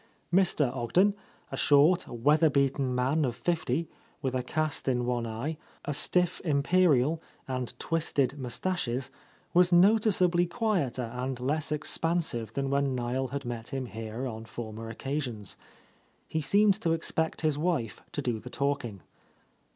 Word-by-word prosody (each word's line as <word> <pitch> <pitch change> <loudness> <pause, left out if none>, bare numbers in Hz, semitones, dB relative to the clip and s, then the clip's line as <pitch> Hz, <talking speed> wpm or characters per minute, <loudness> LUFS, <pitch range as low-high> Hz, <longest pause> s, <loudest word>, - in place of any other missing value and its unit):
Mr. 165 -8 +2
Ogden, 180 - +3 0.4
a - - -3
short, 150 +5 +4
weather 150 +7 +3
beaten 135 -2 +1
man 135 +5 +1
of 125 -4 -1
fifty, 165 -2 -1 0.3
with 130 -3 -2
a 130 - 0
cast 155 +4 -2
in 125 -2 +1
one 120 -1 -1
eye, 125 +8 -4 0.3
a 145 - -1
stiff 180 +5 +2
imperial, 155 -1 +3 0.3
and 130 -2 -4
twisted 150 -5 0
moustaches, 130 -1 -2 0.4
was 180 +1 +5
noticeably 180 -2 +4
quieter 160 - -1
and 125 +1 -3
less 150 +5 -1
expansive 155 - 0
than 135 +1 -1
when 140 -1 +1
Niel 125 +2 -1
had 140 +1 -5
met 115 -2 -5
him 135 -1 -3
here 110 +3 -5
on 110 -3 -5
former 115 -1 -7
occasions. 120 -4 -4 0.7
He 160 - -1
seemed 200 +8 +3
to 165 -1 +2
expect 160 0 -1
his 155 -2 +1
wife 145 - -1
to - - -3
do 120 -3 -1
the 125 - -9
talking. 140 -8 -2
140 Hz, 145 wpm, -29 LUFS, 125-165 Hz, 0.7 s, was